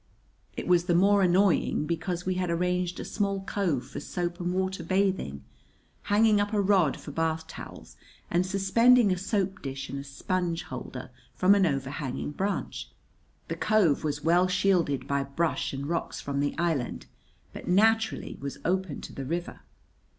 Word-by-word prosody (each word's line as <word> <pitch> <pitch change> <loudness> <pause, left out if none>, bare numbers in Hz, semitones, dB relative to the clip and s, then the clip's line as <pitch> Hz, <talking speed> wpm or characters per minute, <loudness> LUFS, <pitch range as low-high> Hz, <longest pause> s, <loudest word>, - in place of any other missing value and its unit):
It - - -4
was 175 -1 +4
the 175 -2 +2
more 200 +3 +5
annoying 185 -4 +3
because 170 +2 -3
we 185 - +1
had 180 -1 -1
arranged 180 +1 0
a - - -5
small 200 -1 -1
cove 180 -10 -1
for 135 - -7
soap 175 -1 -4
and 175 0 -1
water 190 +1 -1
bathing, 190 - 0 0.6
hanging 210 0 +4
up 205 +2 -2
a 210 - +2
rod 190 -7 +3
for - - -8
bath 160 +1 -1
towels 160 - -11 0.3
and 175 +1 +3
suspending 205 +4 +4
a 185 - +1
soap 195 -1 -1
dish 135 0 -5
and 140 - -4
a - - -6
sponge 170 +4 -2
holder - - -7 0.2
from 185 +2 +5
an 195 -2 +4
overhanging 135 -1 -3
branch. 195 +6 -3 0.6
The - - -3
cove 195 -11 +2
was 150 -1 -2
well 175 +3 +4
shielded 180 -8 +1
by 140 0 +1
brush 155 +4 -1
and 140 0 -5
rocks 165 +3 -2
from 140 0 -3
the 145 0 -1
island, 160 -8 -1 0.5
but - - -9
naturally 220 +4 +2
was 140 0 -5
open 185 -3 -1
to - - -9
the 135 - -5
river. 170 +5 -4
180 Hz, 165 wpm, -28 LUFS, 150-195 Hz, 0.6 s, more